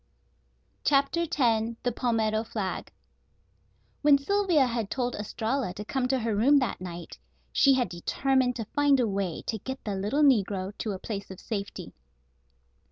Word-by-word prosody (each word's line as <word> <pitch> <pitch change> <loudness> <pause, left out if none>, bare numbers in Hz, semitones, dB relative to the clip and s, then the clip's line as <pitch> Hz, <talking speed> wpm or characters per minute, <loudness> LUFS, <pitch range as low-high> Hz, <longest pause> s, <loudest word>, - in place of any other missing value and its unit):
CHAPTER 295 +4 +2
X 230 -5 +1
THE 245 - +1
PALMETTO 220 -2 0
FLAG 210 -4 -4 1.1
When 290 -1 +6
Sylvia 355 -1 +2
had 230 -4 -2
told 245 -2 -1
Estralla 220 0 -2
to 210 - -6
come 260 +2 -1
to 265 +1 +1
her 225 -3 -1
room 265 +8 +5
that 255 -9 -1
night, 175 -2 -8 0.3
she 275 -1 +5
had 250 -2 +1
determined 255 +8 0
to 225 - -4
find 290 -2 +4
a 240 - +2
way 195 -5 -2
to 220 - -2
get 265 +6 -6
the 210 - -3
little 210 +10 +1
negro 200 -7 +2
to 215 - -2
a - - -4
place 200 0 -6
of 190 -1 -9
safety. 200 -3 -5
235 Hz, 160 wpm, -28 LUFS, 205-270 Hz, 1.1 s, When